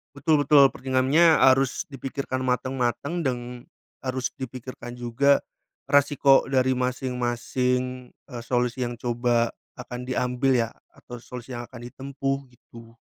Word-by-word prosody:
Betul 145 0 +2
betul. 140 -3 +7
pertimbangannya 135 +7 +3
harus 130 0 +4
dipikirkan 135 -1 -4
mateng-mateng 130 +4 -1
deng 130 -6 -1 0.6
harus 130 -1 -3
dipikirkan 125 -1 -7
juga 125 +4 +2 0.5
resiko 140 -1 +4
dari 130 -1 +2
masing-masing, 125 0 -2 0.2
eee, 120 -1 -6
solusi 125 0 0
yang 120 - -6
coba 120 0 0 0.2
akan 125 0 -7
diambil 130 +1 +1
ya, 115 -2 +1 0.3
atau 120 0 -10
solusi 125 +1 -9
yang 120 -1 -6
akan 120 -2 -11
ditempuh, 135 +2 -3
gitu. 115 -2 -16
130 Hz, 120 wpm, -25 LUFS, 120-135 Hz, 0.6 s, betul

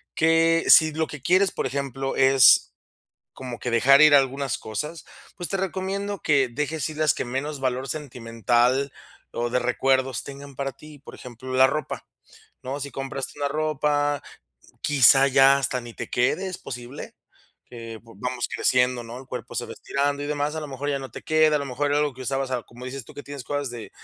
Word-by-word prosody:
que 165 0 +3
si 160 -1 +8
lo 160 +1 0
que 150 -3 -9
quieres, 185 +7 +3
por - - -2
ejemplo, 135 0 -3
es 135 - +6 0.6
como 125 -2 -7
que 125 - -4
dejar 135 +5 +6
ir 155 -1 +7
algunas 135 -1 +2
cosas, 150 +10 -6 0.3
pues 175 -1 -5
te 195 - -1
recomiendo 195 +2 -3
que 140 -4 +2
dejes 150 +5 -3
ir 155 - -9
las 155 -2 +3
que - - -3
menos 135 +4 -4
valor 130 0 -2
sentimental 125 -1 0 0.4
o 120 0 -2
de 125 - +1
recuerdos 130 +1 +1
tengan 140 0 -10
para 135 0 -3
ti. 150 +3 -14
Por 145 - -13
ejemplo, 125 +1 -9
la 130 +1 +6
ropa, 155 +3 -4 0.6
¿no? 135 +2 -5
Si 140 0 -6
compraste 135 +1 -6
una 145 - 0
ropa, 145 -1 0 0.5
q - - -25
quizá 135 -1 +6
ya 135 +1 +6
hasta 130 -2 -1
ni 120 -1 -11
te - - -6
quede, 150 +10 +1
es 185 - -6
posible 125 +2 -8 0.5
que 115 -2 -8
v 115 - -15
vamos 125 +1 -2
creciendo, 125 -1 +1
¿no? 115 +1 -9
El 130 - -12
cuerpo 125 -2 -7
se 120 - -2
va - - -8
estirando 140 +1 -2
y - - -4
demás, 150 0 -2
a 160 - -3
lo 150 - -7
mejor 140 +1 -5
ya 140 -1 -1
no 135 -2 -8
te - - -9
queda, 155 -1 +3
a - - +1
lo 140 - -4
mejor 135 +3 -2
era 145 - +2
algo 150 -2 0
que 130 - -9
usabas, 135 0 -2
a 125 -2 -1
como 120 +1 -13
dices 130 0 -6
tú - - -14
que 145 - -10
tienes 140 -2 -7
cosas 145 +1 -3
de 120 -2 -8
135 Hz, 205 wpm, -24 LUFS, 125-150 Hz, 0.6 s, si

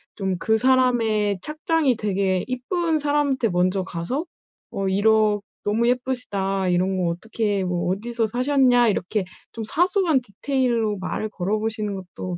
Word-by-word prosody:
좀 190 -3 -2
그 220 +4 +2
사람의 230 -5 +2
착장이 305 -3 +1
되게 195 -3 0
이쁜 315 +6 -1
사람한테 285 -5 +1
먼저 185 +1 +1
가서 185 - -3 0.5
어 195 -1 -2
이러 210 +1 +3 0.2
"너무 225 +3 +1
예쁘시다. 205 -7 -1
이런 185 +2 +1
거 175 -2 +1
어떻게 205 +2 -2
뭐 180 -1 -1
어디서 230 +3 -2
사셨냐." 250 0 +3
이렇게 200 +1 -1 0.3
좀 225 - -6
사소한 345 - +2
디테일로 235 -1 -1
말을 200 +3 -3
걸어보시는 210 +2 -2
것도 185 -1 -6
220 Hz, 300 characters per minute, -23 LUFS, 195-255 Hz, 0.5 s, 이러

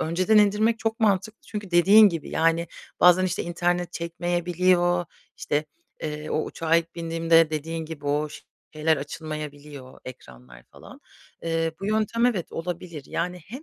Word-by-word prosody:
önceden 185 +7 +2
indirmek 210 +2 +3
çok 225 +1 -2
mantıklı. 210 0 +1
Çünkü 205 -3 -6
dediğin 200 +5 +7
gibi, 165 -4 -5
yani, 165 +1 +1 0.3
bazen 180 +1 +6
işte 180 -1 -1
internet 175 +1 -1
çekmeyebiliyor, 175 +1 0 0.3
işte, 150 +1 -1 0.4
eee, 150 0 -5
o 155 - 0
uçağa 165 0 0
ilk 170 0 -2
bindiğimde 165 -1 +2
dediğin 160 +1 -4
gibi 150 -3 -8
o 150 +1 0 0.5
şeyler 155 0 +2
açılmayabiliyor, 145 -2 -8
ekranlar 65 - -12
falan. - - -15 0.4
Eee, 165 -1 -1
bu 195 - -4
yöntem, 220 +2 +1
evet 205 -9 -2
olabilir, 170 -2 -6
yani 180 +1 -3
hem, 255 +9 -9
170 Hz, 140 wpm, -25 LUFS, 155-185 Hz, 0.5 s, dediğin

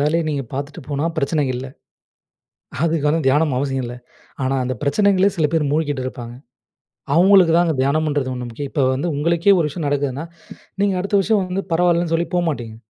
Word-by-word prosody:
வேலைய 155 +4 +1
நீங்க 145 -2 -2
பார்த்துட்டு 140 +2 -5
போனா, 145 +1 -2
பிரச்சனை 150 +1 0
இல்ல. 125 +2 -5 1.2
அதுக்கு 160 -3 0
வந்து 160 +2 +1
தியானம் 145 0 +2
அவசியம் 135 -1 -1
இல்லை. 120 +1 -7 0.5
ஆனா, 135 +1 0
அந்த 130 +1 -2
பிரச்சனைகள்ளே 195 +6 +3
சில 160 -4 +1
பேரு 160 -2 +2
மூழ்கிட்டு 145 -3 -1
இருப்பாங்க. 120 -2 -7 0.8
அவுங்களுக்கு 185 0 +6
தான், 175 - +4
அந்த 160 -3 0
தியானம்ன்றது 145 -1 0
ஒண்ணு 125 -1 -5
முக்கியம். 140 +4 -6
இப்ப 140 -4 +1
வந்து 140 +7 -2
உங்களுக்கே 170 +6 +3
ஒரு 165 - +1
விஷயம் 150 0 -4
நடக்குதுன்னா, 140 +1 -2 0.6
நீங்க 200 -1 +2
அடுத்த 200 +2 0
வருஷம் 210 +1 +1
வந்து 185 +2 -3
பரவால்லன்னு 170 0 +2
சொல்லி 170 +1 0
போகமாட்டீங்க. 145 -11 -2
150 Hz, 170 wpm, -20 LUFS, 140-170 Hz, 1.2 s, அவுங்களுக்கு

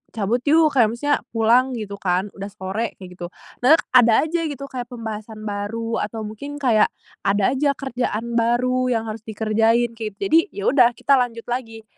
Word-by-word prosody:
cabut 220 +3 0
yuk!" 310 +1 +5
kayak 245 -6 +4
maksudnya, 290 +4 +1 0.2
"Pulang," 245 +4 +3
gitu, 205 -3 -6
kan, 185 +2 -1
"udah 195 0 -7
sore," 205 +2 -4
kayak 185 -2 -11
gitu. 175 -1 -7 0.3
Nah 260 +6 +6
et - - -1
ada 240 0 +6
aja, 330 +2 -1
gitu, 280 -2 -6
kayak 245 -2 -5
pembahasan 220 -2 -7
baru, 220 +2 -3
atau 220 +1 -4
mungkin 220 +8 -7
kayak, 245 -7 +3 0.4
ada 200 +3 +2
aja 280 +1 +1
kerjaan 235 -3 -2
baru 255 +2 +1
yang 230 -3 0
harus 220 0 -6
dikerjain, 225 +2 +1
kayak 220 -3 -6
gitu. - - -52
Jadi, 325 - +7 0.2
ya 200 - -5
udah, 245 -3 +4
kita 275 -1 +3
lanjut 230 -2 -2
lagi. 225 -3 -4
230 Hz, 185 wpm, -22 LUFS, 215-255 Hz, 0.4 s, Jadi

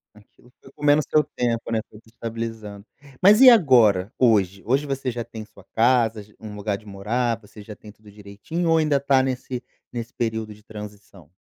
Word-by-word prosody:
Aquilo 105 +3 -22
foi 135 - -17
comendo 145 0 +3
o - - -6
seu 155 - +3
tempo, 115 -3 -3
né, 115 - +1
foi 105 - -15
desestabilizando. 115 -3 -7 0.4
Mas 210 +5 +6
e 260 - +11
agora, 115 - +4
hoje 100 -6 +2
hoje 135 +5 +1
você 135 -2 -3
já 120 0 -5
tem 110 -2 -10
sua 100 - -19
casa, 115 -2 +2
já 105 +1 -22
um 105 -1 -9
lugar 105 -1 -3
de 110 - -19
morar, 115 +4 -2
você 105 0 -15
já 105 +1 -10
tem 105 - -14
tudo 105 0 -19
direitinho 105 - -5
ou 165 - +4
ainda 150 -3 +2
tá 135 -1 +3
nesse 130 -1 -4 0.3
nesse 120 0 -6
período 110 -2 -3
de 105 - -20
transição? 105 -5 -12
115 Hz, 195 wpm, -23 LUFS, 105-130 Hz, 0.4 s, e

